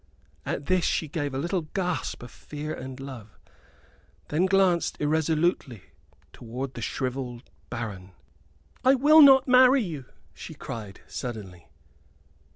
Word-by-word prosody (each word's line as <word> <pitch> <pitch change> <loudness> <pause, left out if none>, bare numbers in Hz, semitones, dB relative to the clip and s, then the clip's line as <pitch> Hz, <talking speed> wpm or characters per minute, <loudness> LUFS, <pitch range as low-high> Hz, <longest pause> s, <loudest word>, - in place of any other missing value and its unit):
At 140 - -3
this 185 +1 +2
she 160 - 0
gave 145 -1 -3
a 130 - -4
little 175 +6 -1
gasp 180 -3 -3
of 120 - -10
fear 150 +1 -7
and 130 0 -8
love, 125 -6 -10 0.9
then 170 +5 +2
glanced 190 -3 +2
irresolutely 155 - 0 0.5
towards 125 +3 -6
the - - -7
shrivelled 125 -2 -4 0.2
baron. 95 -6 -6 0.7
"I 260 +1 +6
will 300 +4 +7
not 270 -2 +7
marry 255 0 +6
you!" 155 -9 -6 0.3
she - - -10
cried, 105 -4 -8
suddenly. 100 -8 -7
145 Hz, 125 wpm, -26 LUFS, 125-185 Hz, 0.9 s, will